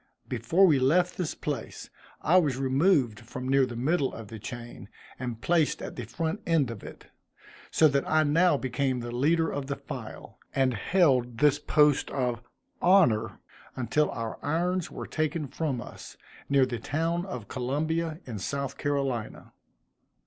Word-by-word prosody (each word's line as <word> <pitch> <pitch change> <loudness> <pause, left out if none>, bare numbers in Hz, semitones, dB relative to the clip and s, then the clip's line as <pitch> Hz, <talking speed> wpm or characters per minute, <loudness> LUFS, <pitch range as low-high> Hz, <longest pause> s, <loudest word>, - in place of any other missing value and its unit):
Before 190 +4 +3
we 150 -7 +4
left 175 +8 +3
this 180 -4 -3
place, 145 -2 -5 0.3
I 175 +4 +5
was 145 -8 +2
removed 135 - +2
from 125 +2 -7
near 135 0 +3
the 120 - -7
middle 140 +4 +1
of 110 -3 -9
the 110 - -8
chain, 120 -2 -8 0.3
and 120 -3 -4
placed 165 0 +2
at - - -7
the 125 - -5
front 165 - -3
end 155 -8 +2
of 110 - -9
it; - - -12 0.6
so 160 - +5
that 140 -1 0
I 155 0 +4
now 160 +2 +3
became 130 0 -1
the 120 0 -5
leader 160 +6 +2
of 140 -2 -4
the 140 - -2
file, - - -9 0.2
and 130 -2 +2
held 125 - +2
this 145 +2 +4
post 150 -1 +3
of 125 -3 -1 0.4
honor 175 - +4 0.4
until 130 +5 +1
our 115 -1 -5
irons 175 +4 0
were - - -7
taken 155 -1 -2
from 140 -2 -2
us, - - -10 0.3
near 140 -2 +4
the 120 -2 -4
town 165 +8 -1
of 125 - -6
Columbia 155 +6 -2
in 115 -5 -6
South 140 +6 -4
Carolina. 135 -6 -2
140 Hz, 160 wpm, -28 LUFS, 125-160 Hz, 0.6 s, I